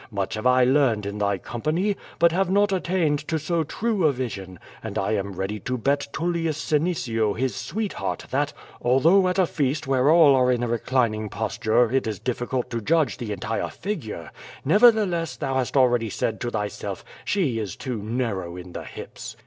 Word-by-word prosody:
Much 100 -4 -3
have 110 +3 -1
I 125 0 +5
learned 125 -5 +3
in 100 +1 -4
thy 100 -1 +1
company, 155 - -1 0.2
but 170 0 +5
have 185 +2 +1
not 205 +1 +3
attained 175 -5 +1
to 160 - 0
so 165 +2 0
true 210 +3 -1
a - - +4
vision, 100 -8 -5 0.2
and - - -5
I 95 - 0
am 100 -2 -1
ready 95 +3 -3
to 125 +6 -3
bet 140 +4 0
TuUius 165 -1 -1
Senecio 145 - 0
his 130 +1 -1
sweetheart 210 +3 -3
that— 145 +3 +1 0.3
although 165 +10 +4
at 180 - 0
a 190 - +4
feast, 150 -1 -1
where 135 +1 +2
all 160 -3 +7
are 125 -1 +4
in 120 -1 0
a - - 0
reclining 115 -2 0
posture, 110 +2 +1
it 135 -3 +1
is 110 -2 -2
difficult 125 +2 -3
to 115 -1 -2
judge 155 +2 +1
the 115 -4 -4
entire 110 +2 -2
figure; 120 - -5 0.3
nevertheless 195 - +4
thou 135 -3 -2
hast 130 +1 0
already 120 -3 +3
said 110 +2 -2
to 120 - -1
thy 105 -3 -1
self: - - -7 0.2
*She 150 - 0
is 105 -5 -4
too 125 -5 -4
narrow 105 -6 -3
in 90 0 -9
the - - -6
hips.' - - -9
130 Hz, 190 wpm, -24 LUFS, 110-165 Hz, 0.3 s, all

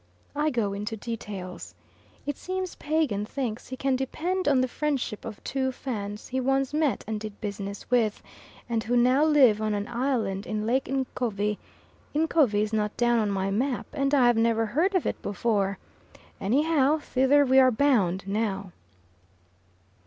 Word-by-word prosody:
I 300 +1 +1
go 225 -7 -1
into 210 +3 -4
details. 205 -5 -7 0.5
It 290 - -2
seems 370 +2 -4
Pagan 295 -10 0
thinks 235 0 -4
he 260 - -6
can 270 0 +1
depend 335 +8 -2
on 275 -3 +4
the 255 - +1
friendship 275 -5 -2
of 215 -3 -8
two 265 -1 -1
Fans 210 -6 -5
he 260 - -1
once 270 +1 +1
met 300 -3 +1
and 215 0 -3
did 215 -1 -8
business 200 -1 -5
with, 225 -4 +2 0.4
and 230 -2 -1
who 245 +2 +1
now 255 +4 +4
live 270 -9 +5
on 215 -1 0
an 205 0 -3
island 235 -6 -1
in 215 -1 -2
Lake 260 +4 +1
Ncovi 230 -6 -1 0.6
Ncovi 295 -10 +3
is 215 +1 -4
not 210 -1 -1
down 240 -1 +3
on 215 -2 +1
my 195 0 -1
map 250 +5 -1
and 275 -1 +1
I 260 -3 +5
have 240 -1 +4
never 225 0 +2
heard 325 - +1
of 370 - +1
it - - -2
before 200 -1 0 0.6
anyhow 290 +6 +2
thither 285 0 +3
we 265 0 +5
are 260 -1 +7
bound 220 -8 +2
now. 200 -2 -2
240 Hz, 165 wpm, -27 LUFS, 210-275 Hz, 0.6 s, are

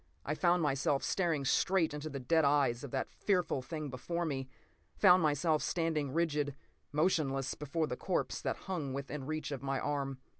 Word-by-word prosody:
I 150 - 0
found 175 +1 +2
myself 140 -1 +1
staring 165 -7 0
straight 170 +3 +2
into 150 +1 -4
the 140 - -5
dead 160 +6 +2
eyes 140 -4 +2
of 140 - -5
that 130 +1 -2
fearful 180 -9 0
thing 150 +2 -5
before 170 +7 -3
me, 135 -4 -3 0.5
found 185 -2 +6
myself 155 0 +2
standing 160 -5 0
rigid, 150 -3 0 0.4
motionless, 145 -4 +1
before 150 +2 -2
the 125 - -3
corpse - - -1
that - - -2
hung 160 -8 -3
within 140 0 -5
reach 155 -1 -3
of 140 - -4
my 135 -1 -1
arm. 140 -2 -2
150 Hz, 175 wpm, -33 LUFS, 135-165 Hz, 0.5 s, found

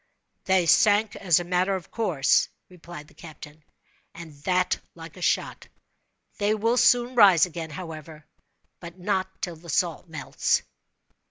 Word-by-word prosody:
"They 190 -2 +2
sank 205 +5 +3
as 175 -4 +2
a - - -4
matter 180 +2 0
of 185 - -8
course," 175 -12 +1 0.2
replied 175 -4 -12
the - - -21
captain, 155 -2 -13 0.5
"and 165 -2 -10
that 180 0 +1 0.2
like 165 -1 -11
a 180 - -12
shot. - - -1 0.7
They 210 +1 +1
will 230 +3 0
soon 245 0 +3
rise 195 -9 +6
again, 165 -2 -7
however—but 160 +1 -12
not 190 0 -1
till 175 -3 -4
the 170 +2 -14
salt 170 +1 -1
melts." 160 -3 -1
175 Hz, 140 wpm, -25 LUFS, 160-195 Hz, 0.7 s, rise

